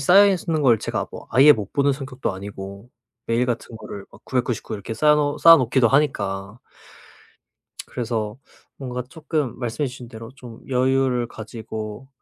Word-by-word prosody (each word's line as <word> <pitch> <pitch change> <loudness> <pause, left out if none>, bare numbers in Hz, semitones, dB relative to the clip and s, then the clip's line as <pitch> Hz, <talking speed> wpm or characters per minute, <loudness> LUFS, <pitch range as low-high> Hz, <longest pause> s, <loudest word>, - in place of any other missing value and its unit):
쌓여 195 +8 +7
있는 165 -5 0
걸 120 -5 +5
제가 - - -3
뭐 - - -9
아예 135 +5 +8
못 105 -7 -5
보는 140 0 +2
성격도 130 -4 -4
아니고 100 +2 -8 0.4
메일 115 +2 +1
같은 120 -1 -3
거를 100 -3 -8
막 - - -17
999 125 -3 -2
이렇게 105 +2 -6
쌓여 150 +2 +3
쌓아 165 0 +10
놓기도 125 -1 +3
하니까. 100 -7 0 1.3
그래서 115 -2 -3 0.4
뭔가 125 -2 -4
쪼끔 150 -1 -3
말씀해 125 +4 -2
주신 125 -1 -10
대로 115 -1 -10
좀 120 -4 -11
여유를 130 -2 +1
가지고 110 +2 -7
125 Hz, 295 characters per minute, -23 LUFS, 110-135 Hz, 1.3 s, 쌓아